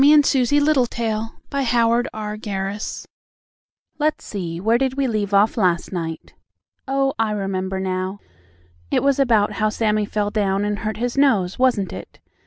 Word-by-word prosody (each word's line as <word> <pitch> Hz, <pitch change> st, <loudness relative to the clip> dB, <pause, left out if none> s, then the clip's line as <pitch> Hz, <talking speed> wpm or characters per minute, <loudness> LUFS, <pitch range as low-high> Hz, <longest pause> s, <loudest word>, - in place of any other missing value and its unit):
XXIII 295 Hz, +1 st, +7 dB
SUSIE 275 Hz, +1 st, +3 dB
LITTLETAIL'S 235 Hz, -6 st, +1 dB, 0.2 s
HOT 240 Hz, -3 st, +2 dB
CROSS 210 Hz, -1 st, -5 dB
BUNS 200 Hz, 0 st, -4 dB, 0.9 s
Let's 305 Hz, +1 st, 0 dB
see, 170 Hz, -5 st, -5 dB
where 225 Hz, +5 st, +2 dB
did 265 Hz, -1 st, 0 dB
we 275 Hz, -, +1 dB
leave 215 Hz, -5 st, -1 dB
off 205 Hz, +3 st, +3 dB
last 180 Hz, -5 st, +1 dB
night? 165 Hz, -3 st, -5 dB, 0.5 s
Oh, 270 Hz, 0 st, +1 dB
I 225 Hz, -1 st, +2 dB
remember 190 Hz, -1 st, -2 dB
now, 185 Hz, +1 st, -2 dB, 0.7 s
it -, -, +1 dB
was 280 Hz, 0 st, +2 dB
about 225 Hz, -6 st, +3 dB
how 215 Hz, -1 st, 0 dB
Sammie 215 Hz, -1 st, 0 dB
fell 205 Hz, 0 st, -1 dB
down 200 Hz, -2 st, 0 dB
and 210 Hz, 0 st, -2 dB
hurt 215 Hz, 0 st, -3 dB
his 245 Hz, +3 st, -1 dB
nose, 205 Hz, -10 st, +2 dB
wasn't 235 Hz, -8 st, +2 dB
it? 95 Hz, -, -10 dB
215 Hz, 155 wpm, -21 LUFS, 195-250 Hz, 0.9 s, XXIII